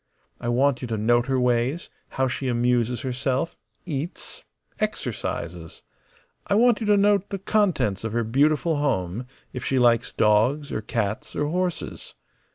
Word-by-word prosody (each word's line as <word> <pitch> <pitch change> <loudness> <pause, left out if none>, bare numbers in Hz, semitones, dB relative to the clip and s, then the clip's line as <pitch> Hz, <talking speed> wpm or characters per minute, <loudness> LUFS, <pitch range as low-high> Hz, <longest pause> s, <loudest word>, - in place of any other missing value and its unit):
I 120 - -3
want 130 +1 +2
you 125 - -4
to 115 -1 -2
note 120 +3 +2
her 135 -1 +1
ways, 125 +6 0 0.3
how 130 0 +2
she 130 +1 -3
amuses 120 -1 +1
herself, 130 +5 -2 0.3
eats, 155 0 -5 0.4
exercises. 85 -1 -4 0.6
I 200 - +2
want 235 +1 +4
you 220 - -3
to 205 -1 +5
note 200 -1 +3
the 200 - -3
contents 190 - +1
of 115 - -3
her 120 0 +1
beautiful 150 +7 +2
home; 120 -5 -1 0.3
if 125 - -5
she 135 - 0
likes 120 -2 +3
dogs 115 +8 +2
or 110 - -2
cats 105 -1 -3
or 145 - 0
horses. 180 +1 -3
125 Hz, 155 wpm, -24 LUFS, 115-155 Hz, 0.6 s, to